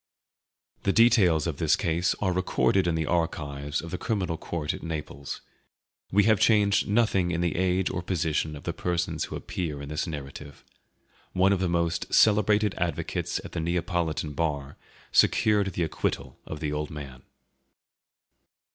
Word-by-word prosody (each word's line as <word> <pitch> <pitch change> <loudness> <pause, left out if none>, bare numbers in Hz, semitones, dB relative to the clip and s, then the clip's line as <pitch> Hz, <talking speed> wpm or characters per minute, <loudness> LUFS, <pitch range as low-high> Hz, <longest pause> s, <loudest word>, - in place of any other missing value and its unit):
[The 100 - +1
details 100 - +5
of - - -2
this - - +3
case 85 +2 0
are 95 -3 +1
recorded 95 0 +2
in 85 - +1
the 80 -1 0
archives 75 -4 -2
of 85 - -8
the 90 - -4
Criminal 95 -7 -1
Court 80 -1 -3
at - - -8
Naples. 75 -4 -6 0.7
We 105 +2 +5
have 110 -2 +4
changed 105 -3 +3
nothing 100 -4 +2
in 85 0 -1
the 85 -3 0
age 95 +1 +1
or 85 - -3
position 80 -4 -1
of 75 - -10
the - - -3
persons 85 -3 -1
who - - -7
appear 80 -5 -4
in 70 0 -7
this 75 +3 -2
narrative. 70 -1 -8 0.7
One 95 +2 +4
of 95 - 0
the 95 -1 0
most 85 -1 -1
celebrated 105 -1 +4
advocates 85 -2 -2
at - - -8
the - - -3
Neapolitan 85 -2 -1
bar 70 -3 -2 0.4
secured 105 -3 +3
the 85 - -1
acquittal 70 -4 -3
of 75 - -6
the 75 -2 -1
old 75 0 -3
man. 70 -4 -8
85 Hz, 160 wpm, -27 LUFS, 75-95 Hz, 0.7 s, details